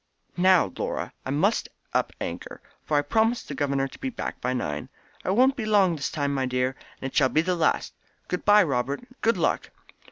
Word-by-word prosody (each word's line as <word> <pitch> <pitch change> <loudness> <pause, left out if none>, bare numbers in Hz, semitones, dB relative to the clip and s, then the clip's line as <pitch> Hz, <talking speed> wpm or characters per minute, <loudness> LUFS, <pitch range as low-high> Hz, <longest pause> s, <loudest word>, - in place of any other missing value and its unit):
"Now, 185 0 +4
Laura, - - -3
I - - -3
must 165 +11 +1 0.2
up - - +1
anchor, - - -5 0.2
for 150 - +1
I 145 - +3
promised 225 +9 +1
the - - -5
governor 140 -1 0
to - - -14
be 270 - -2
back 250 - -5
by 125 - 0
nine. 75 -13 -3 0.3
It 190 - 0
won't 260 +3 +5
be 245 - -3
long 195 -5 +4
this 145 - -2
time, 140 -1 -1 0.2
dear, 125 +1 0 0.2
and 135 - -3
it - - -18
shall 135 -2 +4
be 155 - +3
the 180 +2 0
last. 165 -2 +1 0.3
Good 180 - -3
bye, 210 0 +7
Robert! 140 - -1 0.2
Good 230 -2 +3
luck!" 170 - 0
165 Hz, 200 wpm, -26 LUFS, 135-210 Hz, 0.3 s, bye